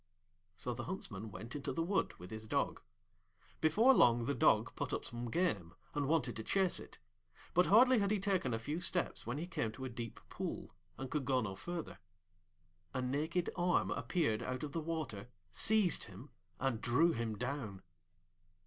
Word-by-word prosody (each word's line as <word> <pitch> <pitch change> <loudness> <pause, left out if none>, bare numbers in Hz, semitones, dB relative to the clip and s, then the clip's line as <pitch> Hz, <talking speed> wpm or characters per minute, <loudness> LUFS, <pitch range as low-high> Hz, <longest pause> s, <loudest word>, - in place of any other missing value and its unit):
So 125 - -2
the 120 0 -5
Huntsman 110 - -5
went 110 +7 -8
into 145 - -3
the 165 +5 -1
wood 195 +4 0
with 90 - -10
his 110 0 -7
Dog. - - 0 0.8
Before 215 - +5
long 120 - +5
the 140 - +1
Dog 115 -2 +3
put 145 - -3
up - - -2
some 120 0 -5
game, 105 - 0 0.2
and 145 -2 0
wanted 145 -5 +1
to 110 - -4
chase 190 - +2
it; - - -11 0.6
but 180 +1 +4
hardly 250 +4 +7
had 200 -1 +2
he 210 -1 +2
taken 190 -9 +1
a 115 - 0
few 145 +9 -3
steps 175 -9 -1
when 120 +4 -2
he 160 - -3
came 115 -11 -2
to 130 +3 -6
a - - -3
deep 115 -1 -6
pool, - - -5 0.2
and 130 -1 -6
could 150 -4 -1
go 130 0 +3
no 100 -4 -3
further. 170 - -6 1.0
A 130 - 0
naked 155 +7 0
arm 175 0 +2
appeared 120 -11 0
out 130 +2 -3
of 150 - -4
the 165 - -2
water, 150 -10 -4 0.2
seized 205 - +4
him, 135 +3 -12 0.3
and 125 -4 0
drew 160 +8 +4
him 115 -6 -2
down. 120 -5 -4
135 Hz, 185 wpm, -36 LUFS, 115-170 Hz, 1.0 s, hardly